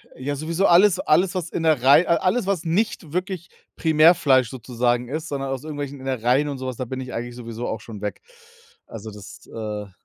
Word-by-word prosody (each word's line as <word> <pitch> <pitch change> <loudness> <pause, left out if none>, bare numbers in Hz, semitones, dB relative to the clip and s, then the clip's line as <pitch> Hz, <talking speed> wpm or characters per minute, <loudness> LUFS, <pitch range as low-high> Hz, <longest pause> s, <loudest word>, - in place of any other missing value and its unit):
ja, 145 +3 -3
sowieso 165 +6 -1
alles 185 +1 +5
alles, 180 +4 +2
was 175 -2 -3
Innerei 155 -1 +4
a 170 - +3
alles, 195 +3 0
was 195 -4 0
nicht 170 -2 -1
wirklich 180 0 -3 0.3
Primärfleisch 155 -6 +4
sozusagen 120 -1 -1
ist, 155 +3 -4
sondern 135 -2 -3
aus 135 +1 -4
irgendwelchen 145 -2 -5
Innereien 130 +2 +1
und 140 -2 -4
so 130 0 -5
was, 125 - -5
da 130 - -3
bin 130 +2 -5
ich 130 - -7
eigentlich 120 +1 -5
sowieso 115 0 -6
auch 110 0 -4
schon 105 -2 -10
weg. 105 - -4 0.7
Also, 110 -1 -8
das, 105 -1 -12
äh 105 -2 -6
135 Hz, 190 wpm, -23 LUFS, 120-165 Hz, 0.7 s, alles